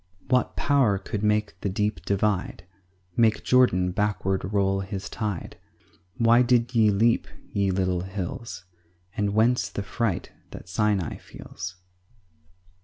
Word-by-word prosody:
4 - - -28
What - - -7
power 135 -8 +2
could 100 +1 -5
make 105 0 +1
the 100 - -1
deep 105 +2 -1
divide? 100 -3 -1 0.5
Make 110 -2 +3
Jordan 95 -8 +3
backward 95 -1 -1
roll 95 -1 +1
his 95 0 -5
tide? 105 -6 -4 0.6
Why 115 +1 +5
did 120 0 +2
ye 110 -3 +5
leap, 115 +4 +2 0.3
ye 100 -1 +1
little 90 -1 0
hills? 95 +2 -6 0.5
And 105 -1 -1
whence 120 +3 +3
the 100 - -4
fright 105 -2 -2 0.2
that - - -10
Sinai 100 -3 0
feels? 90 +1 -9
105 Hz, 130 wpm, -25 LUFS, 95-115 Hz, 0.6 s, Why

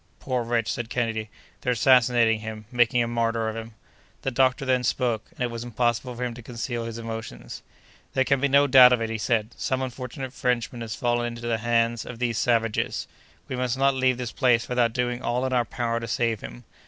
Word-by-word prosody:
"Poor 130 -2 -1
wretch!" 115 -1 0
said 120 -1 -4
Kennedy, 115 -3 -2 0.3
"they're 125 - +1
assassinating 120 -2 +4
him—making 115 +3 0
a - - -2
martyr 115 -1 0
of 110 - -3
him!" 115 -1 -7 0.5
The 135 - -1
doctor 130 +2 +2
then 130 -1 +2
spoke, 120 -2 0
and 170 -5 -14
it 120 -1 0
was 115 0 -5
impossible 120 +1 -1
for 125 - -4
him 120 -1 -2
to 120 - -10
conceal 120 0 -4
his 115 0 -6
emotions. 115 -1 -7 0.5
"There 130 - +4
can 140 0 +1
be 140 - +3
no 140 +1 +5
doubt 130 -2 +8
of 120 - +1
it," 115 - -3
he 110 - -3
said; 110 -1 0
"some 130 0 -1
unfortunate 130 +1 -6
Frenchman 125 -2 -1
has 115 -1 -4
fallen 120 -1 0
into 120 0 -7
the 115 -1 0
hands 115 0 +1
of 125 - -8
these 120 -2 -1
savages. 115 -2 0 0.4
We 130 - -4
must 125 0 -1
not 135 +1 +3
leave 130 -1 +2
this 125 -2 -4
place 120 -3 +2
without 125 -2 +2
doing 125 0 -1
all 125 +2 -1
in 130 - -1
our 120 -2 +2
power 115 -1 -2
to 115 - -6
save 115 -2 0
him. - - -9
120 Hz, 215 wpm, -25 LUFS, 115-125 Hz, 0.5 s, doubt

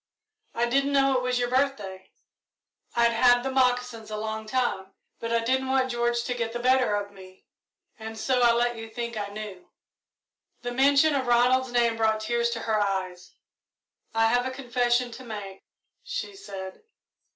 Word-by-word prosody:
I 235 - +2
didn't 275 +4 +1
know 275 -1 +3
it - - 0
was 250 0 0
your 245 0 +1
birthday 235 -9 -1 0.9
I'd 235 0 +4
had 245 +1 +4
the 265 - -2
moccasins 250 -3 0
a 215 - -4
long 220 0 -4
time, 215 -6 -2 0.2
but 230 - -4
I 230 0 +1
didn't 260 +2 0
want 260 -1 +1
George 240 0 0
to 245 - -2
get 230 -2 -3
the 240 - -3
better 255 -3 +3
of 205 0 -3
me, 185 -1 -15 0.5
and 220 0 -7
so 250 +2 +1
I 240 -1 +6
let 240 0 +1
you 225 0 -7
think 235 +1 -5
I 205 -1 -3
knew." 200 -3 -8 0.9
The 245 - -3
mention 280 +4 +4
of 265 -3 -1
Ronald's 250 +2 +3
name 235 -2 +2
brought 220 -1 +1
tears 235 +2 0
to 230 -1 -4
her 220 -2 0
eyes. 185 -3 -3 0.8
"I 225 0 +4
have 245 +2 +2
a - - -2
confession 245 -1 0
to 260 +3 -10
make," 205 -5 -8 0.4
she - - -5
said. 190 - -8
240 Hz, 175 wpm, -26 LUFS, 220-255 Hz, 0.9 s, I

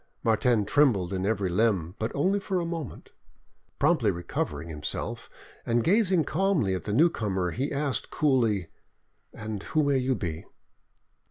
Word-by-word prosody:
Martin 115 -1 +2
trembled 105 -9 +2
in 95 +1 -1
every 100 -3 0
limb, 90 -3 +1
but 110 +2 -2
only 190 +8 +2
for 195 -2 -2
a 170 - -2
moment. 165 -4 -6 0.7
Promptly 145 -7 +3
recovering 85 -4 -3
himself, 75 -2 -5 0.3
and 115 0 +1
gazing 190 -3 +3
calmly 160 - +1
at 95 - -4
the 105 - -2
newcomer, 105 - +1
he 135 - -2
asked 140 -2 -2
coolly— 115 - +1 0.6
"And 105 -2 -6
who 155 +8 0
may 140 -2 +2
you 130 0 0
be?" 85 -6 -5
115 Hz, 145 wpm, -27 LUFS, 95-150 Hz, 0.7 s, Promptly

